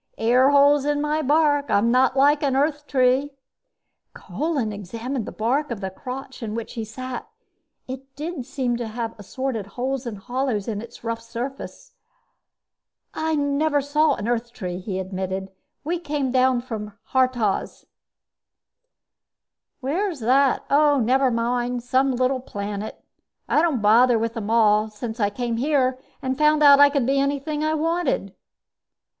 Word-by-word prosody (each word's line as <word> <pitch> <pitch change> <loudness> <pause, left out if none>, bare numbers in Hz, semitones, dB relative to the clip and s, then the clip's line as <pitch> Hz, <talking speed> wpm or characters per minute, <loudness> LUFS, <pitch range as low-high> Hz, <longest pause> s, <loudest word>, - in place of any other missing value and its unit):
Airholes 280 +5 +4
in 290 0 0
my 300 +1 0
bark 290 0 +2
I'm 220 +4 +3
not 255 +1 +3
like 290 +2 +4
an 275 -3 +1
Earth 290 +1 0
tree." 265 +1 +2 0.8
Kolin 285 -9 -2
examined 225 +5 -5
the - - -5
bark 265 +7 0
of 235 -4 -4
the 190 -1 -4
crotch 260 +5 -8
in 220 -2 -4
which 230 -1 -5
he 225 - -4
sat. 250 +3 -7 0.6
It 265 +1 -9
did 310 -1 -5
seem 260 -3 -1
to 235 -1 -4
have 225 0 -4
assorted 225 0 -4
holes 260 0 -2
and 220 -3 -5
hollows 245 -1 -2
in 210 -3 -3
its 235 0 -12
rough 230 0 -3
surface. 250 - -7 1.2
"I 315 0 -1
never 290 +1 +1
saw 300 +3 +2
an 210 - -5
Earth 240 0 -1
tree," 180 -6 -5
he 190 0 -4
admitted. 190 0 -4 0.3
"We 335 +4 -2
came 290 -5 -2 0.3
from 210 -4 -7 0.2
Haurtoz." 255 -6 0 2.0
"Where's 330 +5 -1
that? 260 +4 +2
Oh, 290 0 +4
never 260 +3 +3
mind 240 +1 -1
some 260 +2 +2
little 255 +1 +1
planet. 205 -2 -6 0.4
I 300 - +3
don't 300 -10 0
bother 235 +3 +5
with 230 +1 -1
them 220 -3 -5
all, 215 -1 +3
since 220 +2 -7
I 205 -2 +2
came 235 +2 -3
here 260 -1 +1 0.2
and 260 +1 -2
found 300 0 +4
out 280 -1 +8
I 285 0 +8
could 280 -4 0
be 275 +2 +2
anything 285 +2 -1
I 310 0 +1
wanted." 330 +3 -1
255 Hz, 150 wpm, -23 LUFS, 230-285 Hz, 2.0 s, out